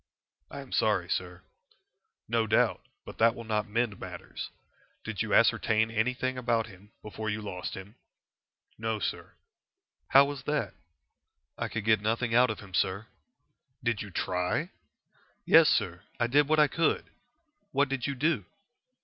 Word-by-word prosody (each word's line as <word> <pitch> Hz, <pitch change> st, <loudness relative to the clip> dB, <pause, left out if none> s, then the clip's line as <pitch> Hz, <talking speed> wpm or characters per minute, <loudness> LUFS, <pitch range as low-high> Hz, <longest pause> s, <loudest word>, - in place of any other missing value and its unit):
"I -, -, -7 dB
am -, -, -13 dB
sorry, -, -, +2 dB
sir." -, -, -3 dB, 0.8 s
"No 115 Hz, -1 st, +1 dB
doubt. 110 Hz, -, +2 dB, 0.2 s
But -, -, -10 dB
that 115 Hz, 0 st, +5 dB
will 115 Hz, -, -7 dB
not 110 Hz, -1 st, -1 dB
mend 110 Hz, -1 st, -1 dB
matters. -, -, -7 dB, 0.5 s
Did -, -, -4 dB
you -, -, -2 dB
ascertain 110 Hz, 0 st, +3 dB
anything 125 Hz, +3 st, -1 dB
about 115 Hz, -2 st, +1 dB
him 100 Hz, -1 st, -16 dB
before 110 Hz, +1 st, -5 dB
you 105 Hz, 0 st, -2 dB
lost 95 Hz, -4 st, -5 dB
him?" 95 Hz, +2 st, -10 dB, 0.9 s
"No, 110 Hz, 0 st, -1 dB
sir." 105 Hz, -, -4 dB, 0.7 s
"How 135 Hz, +1 st, +7 dB
was 140 Hz, -2 st, -5 dB
that?" 150 Hz, -10 st, -1 dB, 0.8 s
"I -, -, -3 dB
could 115 Hz, -2 st, -4 dB
get 110 Hz, -2 st, +4 dB
nothing 115 Hz, +2 st, 0 dB
out 125 Hz, +1 st, +5 dB
of 110 Hz, -, -4 dB
him, 100 Hz, -3 st, -13 dB
sir." 95 Hz, +4 st, 0 dB, 0.8 s
"Did 120 Hz, -3 st, 0 dB
you 105 Hz, -, -6 dB
try?" 90 Hz, -, -1 dB, 0.7 s
"Yes, -, -, +7 dB
sir; 90 Hz, +1 st, 0 dB, 0.2 s
I 120 Hz, -, +3 dB
did 140 Hz, +4 st, +3 dB
what 155 Hz, +1 st, +3 dB
I 150 Hz, -1 st, +6 dB
could." 165 Hz, +3 st, 0 dB, 0.6 s
"What 140 Hz, +1 st, +2 dB
did 135 Hz, -1 st, -2 dB
you 140 Hz, -, -2 dB
do?" 140 Hz, -, 0 dB
115 Hz, 155 wpm, -29 LUFS, 105-125 Hz, 0.9 s, How